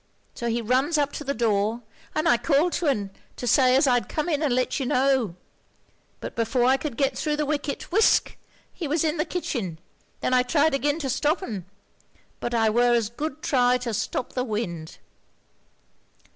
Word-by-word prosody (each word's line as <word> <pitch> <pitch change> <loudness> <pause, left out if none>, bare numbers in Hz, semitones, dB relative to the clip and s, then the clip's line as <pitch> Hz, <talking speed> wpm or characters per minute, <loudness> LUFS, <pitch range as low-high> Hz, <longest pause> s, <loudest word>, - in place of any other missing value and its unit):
So 235 - -4
he 230 +1 -1
runs 260 +8 +2
up 290 -1 +1
to - - -6
the 280 0 -2
door, 220 0 0 0.3
and 310 +2 +1
I 240 - +6
called 310 +6 +2
to 345 - -1
un, 205 -8 0 0.2
to - - -6
say 255 +1 +4
as 275 - +4
I'd 245 -3 +2
come 310 +3 -2
in 300 -3 0
and 300 -4 +1
let 255 +4 0
you 265 - -2
know; 260 -8 +2 0.8
but - - -7
before 235 +2 +1
I 260 +1 +5
could 270 -3 -5
get 275 -1 +1
thro' 300 -1 -1
the 300 0 -1
wicket, 290 +1 -3
whisk 430 +4 +3 0.4
he 330 - -5
was 305 +2 +1
in 315 +1 0
the 310 - 0
kitchen; 230 - -3 0.4
then - - 0
I 250 - +5
tried 290 +4 +2
agin 290 +2 +1
to 270 - -2
stop 300 +8 0
un, 200 - -5 0.7
but 240 0 -3
I 225 -1 +3
were 240 +2 +3
as 225 -2 0
good 305 +4 -5
try 250 -5 +3
to 245 -2 -4
stop 240 - -3
the 250 - -1
wind.' 190 -9 -4
260 Hz, 195 wpm, -25 LUFS, 235-295 Hz, 0.8 s, I